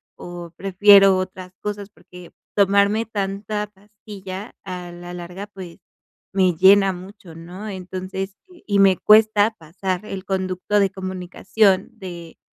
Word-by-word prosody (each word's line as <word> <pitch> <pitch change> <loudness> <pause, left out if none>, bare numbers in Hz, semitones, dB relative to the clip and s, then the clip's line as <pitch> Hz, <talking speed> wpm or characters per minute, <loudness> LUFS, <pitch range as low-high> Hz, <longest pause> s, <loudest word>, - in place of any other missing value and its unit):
o 175 -1 -9
prefiero 195 0 +6
otras 185 0 -5
cosas. 205 -1 -5
Porque 180 -4 -15 0.2
tomarme 200 +2 +3
tanta 210 0 -3
pastilla 205 0 -10
a 180 -2 -7
la 175 0 -9
larga, 180 +3 -8
pues, 190 -4 -11 0.6
me 185 -3 +3
llena 195 +2 +5
mucho, 185 -2 -12
¿no? 175 +6 -9
Entonces 190 0 -6 0.3
y 205 -2 +1
me 195 -2 +5
cuesta 215 0 +4
pasar 185 +4 -4
el 195 -2 -7
conducto 190 +1 -1
de 200 -1 +3
comunicación 190 +2 0
de, 170 -3 -9
190 Hz, 125 wpm, -21 LUFS, 180-205 Hz, 0.6 s, prefiero